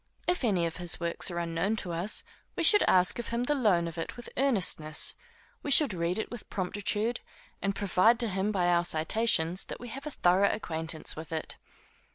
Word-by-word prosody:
If 355 -4 0
any 190 -7 +1
of 165 - -4
his 175 -2 +1
works 170 +2 +2
are 175 - -5
unknown 170 +5 -1
to 190 -5 -3
us, 175 +6 +1 0.3
we - - -2
should 415 - +6
ask 180 +2 +4
of 240 - -5
him 235 +1 -2
the 295 - +1
loan 205 -11 +2
of 165 0 -7
it 165 - -5
with 240 - -10
earnestness; 185 - +1 0.5
we - - -5
should 280 -4 +5
read 170 +1 -2
it 220 - -4
with 240 -3 -9
promptitude, 205 +4 -2 0.4
and 195 0 -1
prove 200 +4 +3
to 235 -1 +1
him 195 +1 -1
by 185 -4 0
our 175 0 +3
citations 175 +1 +1
that - - -8
we 245 - -9
have 275 +5 -8
a - - -2
thorough 190 -6 +2
acquaintance 160 -5 -3
with 160 +1 -9
it. 160 -1 -5
190 Hz, 205 wpm, -29 LUFS, 170-230 Hz, 0.5 s, should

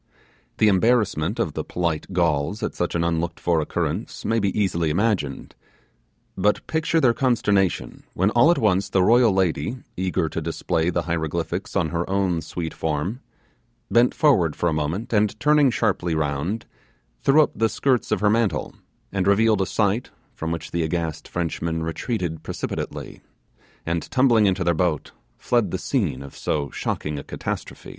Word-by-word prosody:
The 110 - +4
embarrassment 110 +3 +2
of - - -1
the - - -3
polite 85 -1 -2
Gauls 85 +3 0
at - - -2
such 90 - -2
an 85 - +1
unlooked 85 0 -1
for 85 -2 +1
occurrence - - -3
may 115 +1 +2
be 100 -2 +1
easily 85 -5 +1
imagined, 90 -5 -1 0.8
but 105 +2 +1
picture 160 +1 +1
their 125 -6 +4
consternation, 105 - +1
when 95 +4 +2
all 120 +8 +5
at 175 - +4
once 100 -5 +2
the 95 -2 +3
royal 120 +2 +5
lady, 95 +6 0 0.2
eager 90 -3 0
to 80 - -4
display 80 +1 -1
the 85 -1 -1
hieroglyphics 85 +2 -3
on 85 -5 +1
her 85 +3 -2
own 95 -3 +1
sweet 80 0 -5
form, 80 - -2 0.7
bent 120 +1 +4
forward 105 - +3
for 85 - 0
a 80 - +1
moment, 80 +10 -2
and 105 0 +1
turning 150 +1 +4
sharply 85 -7 0
round, 80 +8 -2 0.6
threw 150 +3 +5
up - - -2
the 115 0 +2
skirt 125 +3 0
of - - +1
her 105 - +4
mantle 115 -2 0 0.4
and 95 -1 -1
revealed 105 0 +4
a 95 - 0
sight 105 +3 0 0.2
from 80 +1 -4
which 85 - -5
the 85 - -1
aghast 80 -1 -2
Frenchmen 80 -1 -2
retreated 80 -1 -3
precipitately, 80 - -5 0.6
and 85 0 -2
tumbling 120 -5 +4
into 95 -1 +1
their 85 0 +2
boats, 80 -2 -1 0.3
fled 120 -6 +1
the - - -2
scene 65 +2 -1
of 70 - -11
so 70 -3 -2
shocking 75 -1 -3
a - - -8
catastrophe. - - -6
90 Hz, 165 wpm, -23 LUFS, 80-110 Hz, 0.8 s, all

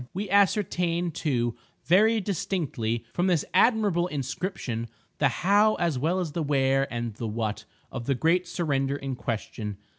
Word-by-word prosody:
We 195 0 -3
ascertain, 180 -4 +2
too, 120 -7 -1 0.3
very 220 +6 +4
distinctly, 145 - -2
from 175 +2 +1
this 175 -5 +2
admirable 205 -7 +3
inscription, 135 - -3 0.3
the 145 - +4
how 205 - +3
as 165 -7 0
well 170 +7 +1
as 175 -4 -2
the 165 - -2
where 135 -2 +1
and 120 -2 -3
the 115 +2 -5
what, 110 -1 -3 0.3
of 120 -3 -5
the 135 - +2
great 170 +7 +2
surrender 140 -6 -1
in 135 -2 -4
question. 110 -3 -4
150 Hz, 150 wpm, -27 LUFS, 120-180 Hz, 0.3 s, very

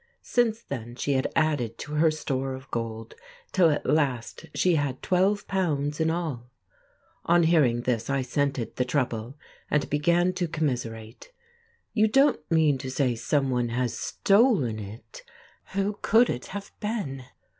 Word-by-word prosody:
Since 230 -2 +1
then 120 -3 -6
she 140 +2 -1
had 130 -1 0
added 145 -8 +1
to 150 - -7
her 155 +2 +4
store 135 -4 -2
of 130 +1 -13
gold, 115 -1 -4 0.4
till 180 -3 +4
at 150 - -1
last 135 -6 0
she 180 - +3
had 145 -4 0
£12 180 -6 0
in 160 - +2
all. 155 -8 -3 0.8
On 170 0 +4
hearing 145 -8 +3
this 120 -2 -1
I 135 -1 +1
scented 135 -1 -2
the 125 - +2
trouble, 125 -1 -2 0.3
and 150 -3 +1
began 170 +5 +2
to 180 -2 -1
commiserate: 125 - -4 0.6
"You 215 -1 +4
don't 270 - +4
mean 155 -4 +3
to 130 - -5
say 130 -1 +1
someone 125 0 0
has 120 0 -1
stolen 195 - +2
it! 110 - -10 0.5
Who 200 +1 -1
could 230 +3 +4
it 125 - -5
have 200 +1 -7
been?" 200 - -3
145 Hz, 145 wpm, -26 LUFS, 125-175 Hz, 0.8 s, her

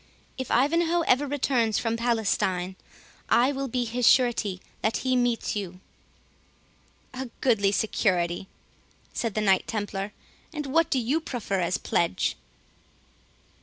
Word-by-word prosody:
If 260 -2 -5
Ivanhoe 335 +7 +2
ever 285 0 +2
returns 250 -6 +1
from 225 -1 0
Palestine, 200 -6 0 0.5
I 250 +4 +4
will 275 -1 -3
be 245 0 -1
his 235 +1 0
surety 235 -7 +3 0.2
that 220 - +1
he 255 0 +2
meets 245 -3 0
you." 185 -3 -5 1.3
"A 260 0 -5
goodly 205 -6 +3
security!" 185 -4 0 0.7
said 230 -4 -2
the 215 - +1
Knight 195 -3 +3
Templar; 205 -2 -3 0.4
"and 300 -3 -4
what 325 +4 +2
do 270 - +1
you 260 +7 0
proffer 230 -10 -3
as 180 +1 0
a - - -20
pledge?" 170 - 0
230 Hz, 130 wpm, -26 LUFS, 200-260 Hz, 1.3 s, I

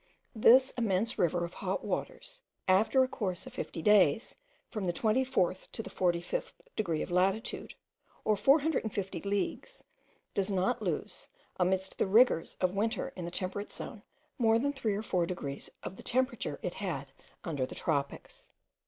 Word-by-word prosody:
This 255 +3 +6
immense 220 0 0
river 175 0 +2
of 170 - -9
hot - - -3
waters, - - -4 0.3
after 215 +8 +5
a - - +1
course 185 -8 -3
of - - -10
fifty 165 - -5
days, 210 - +4 0.3
from 210 -3 -4
the 175 - 0
24th 215 -4 +1
to 225 - -4
the - - -8
45th 175 - -1 0.2
degree 170 -7 0
of - - -7
latitude, 190 +5 0 0.5
or 215 - +4
450 225 -5 +2
leagues, 205 - -2 0.5
does 195 0 0
not 195 +5 +1
lose, - - -3 0.3
amidst 190 +1 0
the - - +2
rigours 215 -4 +4
of 185 0 +1
winter 225 +6 -1
in 180 - -5
the - - -3
temperate 190 +3 -4
zone, 220 - -7 0.4
more 225 -2 +5
than 285 +4 0
3 225 -7 -1
or 210 - -3
4 180 -5 +1
degrees 140 -6 -5
of 190 - -6
the - - -9
temperature 240 - -1
it 180 - -2
had 145 -9 -4 0.3
under 145 -6 -2
the - - -9
tropics. 160 - -3
200 Hz, 160 wpm, -31 LUFS, 180-230 Hz, 0.5 s, This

